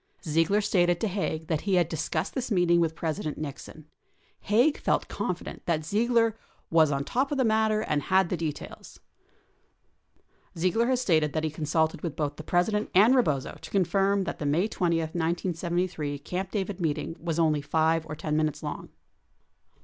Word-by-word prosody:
Ziegler 165 +6 +2
stated 175 -4 +2
to 220 - 0
Haig 180 -5 -2
that 160 -2 -1
he 195 -2 +1
had 175 -3 +3
discussed 160 -1 -2
this 255 -2 -3
meeting 175 -4 +3
with 160 -1 +1
President 155 -1 -3
Nixon. 150 +1 -8 0.5
Haig 245 +9 +2
felt - - 0
confident - - -4
that 155 -3 0
Ziegler 230 +4 +2 0.2
" - - -38
was 160 -2 +5
on 140 0 -1
top 265 - -1
of 290 - -1
the 260 - +2
matter 220 -1 +2
and 150 -8 0
had 190 0 +2
the - - 0
details." 160 -3 -6 1.6
43 - - -9
Ziegler 225 +7 +2
has 255 -1 +1
stated 155 - +2
that 155 - -1
he 155 - -1
consulted 160 +1 0
with 165 -4 -4
both 145 -1 -2
the 155 - -7
Presi 175 +6 +1
dent 210 0 -1
and 215 +7 +7
Rebozo 150 - 0
to - - -9
confirm 195 +1 +2
that - - -5
the 150 - -2
May 165 +8 +2
20. 175 -6 0
1973, 170 -1 -2
Camp 180 +6 -4
David 195 -2 -3
meet 160 -2 0
ing 165 - -5
was 165 -1 -3
only 155 -3 +2
5 160 +2 +1
or 155 - -5
10 150 0 -3
minutes 155 -1 -1
long. 150 - -5
170 Hz, 185 wpm, -27 LUFS, 155-200 Hz, 1.6 s, and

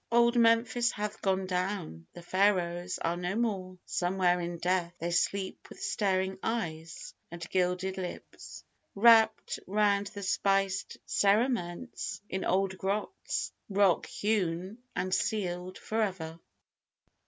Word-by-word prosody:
Old 235 +1 +4
Memphis 230 0 +4
hath 210 0 -4
gone 190 -2 +1
down: 180 - -3
The 175 - -10
Pharaohs 180 -2 +1
are 165 +1 -1
no 180 +2 -2
more: 195 -6 -1
somewhere 180 0 +1
in 170 0 -4
death 175 0 0
They 170 +1 -3
sleep 190 +2 -1
with - - -12
staring 190 -2 0
eyes 165 -8 -4 0.2
and 170 0 -7
gilded 185 +1 0
lips, 180 -1 -8 0.3
Wrapped 220 +1 +5
round 200 0 +2
with 200 -1 -5
spiced 195 0 +1
cerements 215 0 0
in 190 0 -2
old 190 +1 +1
grots 200 - -2 0.2
Rock 195 -3 +3
hewn 195 0 -1 0.2
and 185 0 -1
sealed 185 -4 -1
for 225 +1 -2
ever. 170 -6 -3
190 Hz, 120 wpm, -30 LUFS, 180-210 Hz, 0.3 s, Wrapped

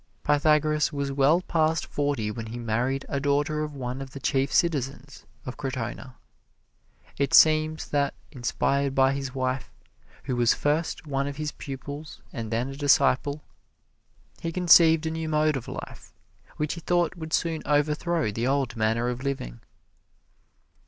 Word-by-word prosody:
Pythagoras 150 0 +2
was 140 -1 -2
well 140 +5 +3
past 160 -2 +1
forty 140 -7 -1
when 115 +1 -6
he 115 +2 -6
married 120 +4 -1
a 140 - -2
daughter 145 +2 0
of 150 -1 -4
one 130 0 -4
of 135 -1 -8
the 140 - -7
chief 135 +1 0
citizens 140 -4 -1 0.2
of 125 - -6
Crotona. 130 0 -5 1.0
It 140 -1 +3
seems 155 0 +4
that, 140 -1 0 0.2
inspired 135 +2 0
by 135 0 +4
his 135 -1 -5
wife, 130 0 -2 0.5
who 130 - -2
was 120 -1 +3
first 155 +2 -1
one 140 -1 -1
of 140 0 -6
his 155 -1 -3
pupils 140 +2 -8
and 115 -2 -5
then 120 +4 -1
a 135 - -7
disciple, 140 0 +2 1.0
he 165 - -2
conceived 165 -2 +6
a 160 - -1
new 160 0 -3
mode 155 -1 +2
of 125 -3 -5
life, - - -8 0.5
which 150 0 -1
he 170 - -8
thought 175 +1 +1
would 160 -2 -7
soon 165 -1 0
overthrow 150 -1 +1
the 115 +4 -2
old 135 -3 0
manner 115 +2 +1
of 125 0 -3
living. 130 - -4
140 Hz, 155 wpm, -26 LUFS, 130-155 Hz, 1.0 s, conceived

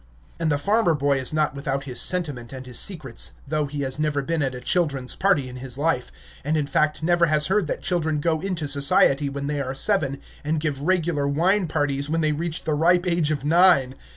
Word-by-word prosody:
And 165 -2 0
the 145 - +2
farmer 200 +2 +2
boy 140 -1 +1
is 130 - -4
not 155 -2 0
without 140 -1 -3
his 130 -3 -2
sentiment 145 -10 -2
and 130 -1 -8
his 125 -2 -1
secrets, 150 - -3
though 150 0 -1
he 145 0 -5
has 135 +1 -2
never 150 -2 0
been 165 +2 -1
at 135 -2 -1
a - - -6
children's 140 -3 0
party 185 -9 +2
in 125 0 -9
his 130 0 -3
life, 140 -4 -1 0.3
and, 155 +3 0
in 150 - 0
fact, 155 +2 0
never 170 0 +3
has 150 -1 +1
heard 195 -3 +1
that - - -4
children 160 -4 0
go 160 0 0
into 180 -5 -3
society 140 0 +3
when 140 0 -5
they 145 0 -2
are 135 0 -4
seven, 140 -5 +1 0.2
and 155 +2 -1
give 150 -3 -3
regular 165 -3 0
wine 175 +7 +2
parties 145 -2 -1
when 165 +1 0
they 155 -1 +2
reach 160 +2 -3
the 155 - -1
ripe 175 +4 +3
age 170 -4 +1
of 145 -3 -2
nine. 165 -5 +4
150 Hz, 220 wpm, -23 LUFS, 140-165 Hz, 0.3 s, nine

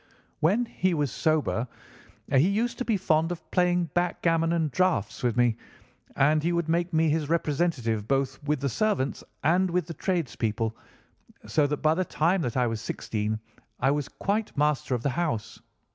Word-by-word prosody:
When 205 +10 +3
he 185 -5 0
was 145 -5 0
sober 140 +1 0 0.6
he 140 +4 +5
used 235 +4 -1
to - - 0
be 220 -3 +1
fond 165 -2 +1
of 160 -2 -7
playing 175 -3 +2
backgammon 165 -2 +1
and 160 -3 0
draughts 180 - 0
with 120 -1 0
me, 120 -2 +3 0.6
and 150 +3 +3
he 170 +3 0
would 170 -1 0
make 170 +2 0
me 160 -1 +3
his 155 -1 -1
representative 145 -9 0
both 135 +1 0
with 150 -1 -1
the 140 - 0
servants 200 - 0 0.2
and 180 +5 +3
with 180 +1 0
the 170 - -6
tradespeople, 115 - -1 0.7
so 150 -2 +2
that 150 0 -3
by 155 0 +5
the 185 +3 0
time 175 +2 +1
that 125 -4 -2
I 125 - +3
was 115 -2 -2
sixteen 110 -1 -3 0.4
I 135 - +3
was 145 -1 -1
quite 210 -1 -2
master 150 -3 +1
of 120 - -4
the 140 - +1
house. 145 -9 -2
155 Hz, 175 wpm, -27 LUFS, 130-175 Hz, 0.7 s, he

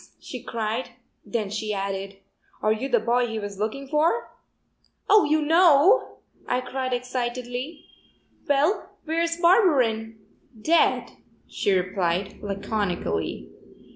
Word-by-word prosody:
she - - -8
cried, 225 +2 -3 0.3
then 225 -4 -2
she 210 +1 -3
added: 195 0 -4 0.5
"Are 215 0 +4
you 260 +5 -4
the 240 -3 +3
boy 240 +2 +1
he 225 -1 -4
was 205 -2 -6
looking 245 +6 -3
for?" 305 +4 +1 0.8
"Oh, 425 0 +6
you 305 +1 +2
know?" 330 - +5 0.3
I 250 - +1
cried 255 0 -4
excitedly. 250 +3 -4 0.6
"Well, 290 +8 +1
where's 335 +1 0
Barberin?" 265 - +3 0.4
"Dead," 330 +9 +2 0.4
she 200 - -1
replied, 185 0 -1
laconically. 195 - -3
245 Hz, 110 wpm, -25 LUFS, 210-295 Hz, 0.8 s, Oh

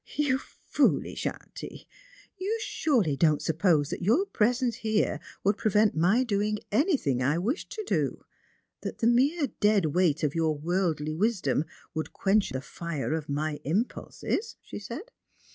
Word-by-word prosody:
" - - -15
You 260 -1 +2
foolish - - 0
auntie! - - -8 0.5
you 405 +4 -2
surely 225 - +1
don't 155 0 +3
suppose 160 -3 +2
that - - -4
your 235 - +3
pre 230 - +2
sence 245 -1 -1
hei'e 215 -8 +1 0.2
would 200 +2 +2
prevent 210 0 +3
my 185 +11 +3
doing 210 -2 0
any 295 - +3
thing 130 - -1
I 140 +5 +2
wished 230 - -2
to 435 - -4
do; - - -1 0.6
that - - -5
the 225 - -1
mere 275 +5 +3
dead 205 -3 +4
weight 170 -4 +2
of 150 -1 +1
your 160 -2 +1
worldly 160 -2 0
wisdom 170 - +1 0.3
would 155 0 -4
quench 200 +1 +2
*he 130 - -3
fire 155 0 -4
of 155 -2 -3
my 150 +1 -1
impulses? 230 - -2
" - - -51
she - - -6
said. 275 - -7
195 Hz, 160 wpm, -28 LUFS, 155-240 Hz, 0.6 s, dead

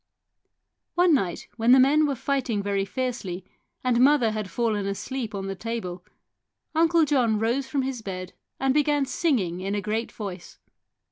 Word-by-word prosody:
One 350 -1 +5
night, 190 - 0
when 235 +2 +5
the 260 - +7
men 295 +4 +5
were 280 - -1
fighting 250 -5 -1
very 200 -1 0
fiercely 205 -6 -4 0.4
and 250 -2 +2
mother 265 -4 +5
had 215 -2 -4
fallen 210 0 -1
asleep 215 +3 -4
on 195 -1 -4
the 195 - -3
table, 190 -3 -5 0.7
Uncle 330 0 +4
John 250 -7 +2
rose 235 +5 0
from 270 0 -1
his 260 -3 -3
bed 185 -3 -6 0.3
and 270 0 +2
began 290 -1 +2
singing 240 - 0
in 195 +2 -2
a - - 0
great 215 +3 -2
voice. 190 -5 -7
230 Hz, 160 wpm, -25 LUFS, 200-270 Hz, 0.7 s, the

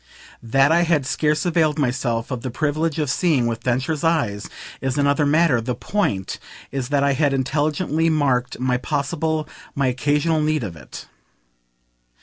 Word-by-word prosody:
That 135 +5 +3
I 170 +1 +4
had 160 -5 +2
scarce 150 +3 0
availed 160 -3 +2
myself 125 -4 -1
of 125 -2 -3
the 130 - -4
privilege 155 +4 -1
of 150 -2 0
seeing 140 -2 +2
with 115 -1 -2
Densher's 130 +6 -1
eyes 145 -12 0 0.3
is 135 +1 -1
another 145 +1 +2
matter; 150 -5 +3
the 120 +2 -3
point 105 - -2 0.3
is 135 -2 -3
that 140 -1 +2
I 140 0 +3
had 145 0 +1
intelligently 150 +4 0
marked 135 -5 0
my 125 -1 +1
possible, 155 +3 -2 0.3
my 140 - +1
occasional 145 +5 +1
need 155 -3 0
of 95 -6 -5
it. 75 -5 -10
145 Hz, 155 wpm, -22 LUFS, 125-155 Hz, 0.3 s, I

